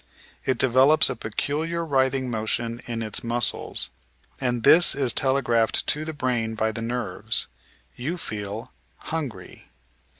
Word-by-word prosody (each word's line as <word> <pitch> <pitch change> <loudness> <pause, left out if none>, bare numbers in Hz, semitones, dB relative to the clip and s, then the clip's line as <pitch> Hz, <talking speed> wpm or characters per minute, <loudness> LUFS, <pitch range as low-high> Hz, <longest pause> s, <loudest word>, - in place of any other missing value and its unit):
It 130 -2 +1
develops 130 +5 +5
a - - -4
peculiar 155 +10 -3
writhing 130 -3 +1
motion 115 +1 -2
in 115 -1 -3
its 110 - 0
muscles, 120 +1 0 0.5
and 120 -2 -1
this 170 +5 +7
is 135 -4 +2
telegraphed 130 -4 +1
to 150 +1 0
the 160 - -3
brain 120 -5 -1
by 110 0 0
the 115 - -5
nerves. 120 +2 -1 0.5
You 155 +9 -4
feel 105 - -5 0.3
"hungry." 130 - -6
125 Hz, 130 wpm, -24 LUFS, 115-140 Hz, 0.5 s, this